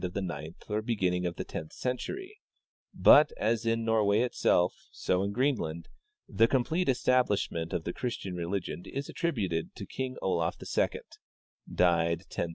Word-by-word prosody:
of 90 -1 -3
the 100 - -2
ninth 85 -3 -6
or 105 0 -1
heginning 90 -6 0
of 85 - -4
the - - -4
tenth 80 - -7
century; 380 - -4 0.7
hut, 150 0 +9
as 115 0 0
in 115 0 +1
Nor 110 -1 +3
way 105 +3 +3
itself, 90 -7 +2 0.2
so 90 0 0
in 100 +1 -1
Greenland, 100 - -1 0.4
the 115 - +4
complete 140 +7 +1
establishment 110 -10 +1
of 80 - -2
the 85 - -3
Christian 115 -6 -4
religion 90 +1 -3
is 140 +1 -5
attributed 100 - -2
to - - -7
King 130 -1 -4
Olaf 85 -3 0
II - - -1 0.7
(died 85 -1 +2
1030). 90 - -4
100 Hz, 160 wpm, -30 LUFS, 90-125 Hz, 0.7 s, hut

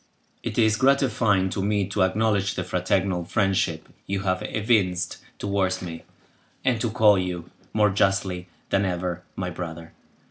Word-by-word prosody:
It - - -4
is 110 -1 +4
gratifying 115 -8 +3
to 95 - -2
me 100 0 +1
to 100 0 -1
acknowledge 100 +1 +2
the - - -2
fraternal 90 0 0
friendship 90 -4 0 0.2
you 95 0 -1
have 95 -1 0
evinced 95 -5 0 0.2
towards 95 -2 0
me, 85 -2 -7 0.6
and 120 -4 +2
to 115 - +1
call 105 -2 +5
you, 90 -2 -4 0.2
more 105 -1 +3
justly 95 -2 +1 0.2
than 100 - +3
ever, 90 -1 -2
my 90 -1 -3
brother. 85 -1 -7
95 Hz, 145 wpm, -25 LUFS, 90-105 Hz, 0.6 s, call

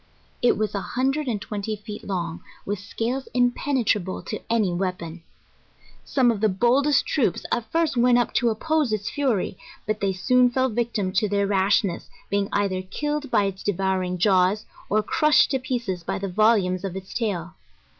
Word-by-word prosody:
It 245 - +3
was 215 -1 -1
a 200 - -2
hundred 270 +6 -1
and 220 -4 -1
twenty 210 +1 -4
feet 210 0 -9
long, 170 -4 -3 0.2
with 205 -1 -2
scales 235 +6 -3
impenetrable 245 -6 +1
to 215 - -5
any 215 -6 +2
wea 185 +1 0
pon. 170 -1 -9 0.8
Some 255 -3 +2
of 210 -3 -4
the 215 - +4
boldest 255 +8 +3
troops 250 - 0
at 235 -2 -2
first 325 -4 +1
went 245 0 +4
up 245 - 0
to 240 - +2
oppose 305 +3 0
its 215 -1 -2
fury, 250 -10 -1 0.3
but 215 0 -1
they 195 -1 +1
soon 250 +7 +3
fell 260 +1 +1
victims 220 -5 0
to 210 -2 -1
their 200 0 +1
rashness, 195 -2 +1 0.2
being 200 0 +1
either 195 -2 0
killed 295 +9 -3
by 205 - +3
its 195 -1 -3
devouring 190 -2 -1
jaws, 190 +2 +3 0.2
or 215 +1 +2
crushed 305 +7 +3
to 265 - +1
pieces 235 -8 -3
by - - -2
the 195 - -3
volumes 195 -2 +2
of 190 -2 -4
its 190 0 -8
tail. 185 -7 -2
210 Hz, 175 wpm, -24 LUFS, 190-245 Hz, 0.8 s, the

